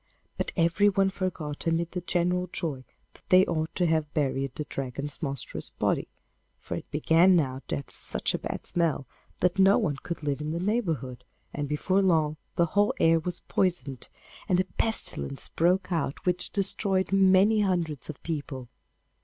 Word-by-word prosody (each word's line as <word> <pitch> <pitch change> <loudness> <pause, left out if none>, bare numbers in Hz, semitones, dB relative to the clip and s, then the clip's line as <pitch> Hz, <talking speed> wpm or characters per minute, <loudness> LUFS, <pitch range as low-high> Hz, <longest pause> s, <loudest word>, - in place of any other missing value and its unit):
But - - -3
everyone 195 +3 +3
forgot 165 -6 -4
amid 165 +1 0
the 180 - -4
general 180 +1 0
joy 140 -6 -4 0.3
that - - -19
they 185 +1 +7
ought 160 -1 -2
to 180 - +1
have 160 -2 +1
buried 135 -3 -1
the 150 - -3
Dragon's 140 +1 -5
monstrous 140 -4 -4
body, - - -1 0.5
for - - -7
it - - -6
began 165 +5 +4
now 135 -5 0
to - - -1
have 140 - -6
such - - 0
a - - -1
bad - - -5
smell 165 -5 0 0.4
that 180 +2 +2
no 195 +1 +6
one 160 - 0
could 170 +2 -6
live 145 0 -1
in 150 - -3
the 165 +2 -2
neighbourhood, 165 - -2 0.3
and 145 -1 -3
before 185 +6 +1
long 160 -5 +2 0.2
the 170 - +3
whole 205 +1 +3
air 165 0 +5
was 180 +2 -3
poisoned, 140 -9 -1 0.4
and 180 -1 +3
a 185 - +2
pestilence 220 -10 +1
broke 185 +3 +1
out 160 -5 -2
which 180 0 0
destroyed 195 -1 0
many 195 +2 +5
hundreds 170 -8 -1
of 150 - -8
people. 140 -6 -5
170 Hz, 170 wpm, -27 LUFS, 145-185 Hz, 0.5 s, they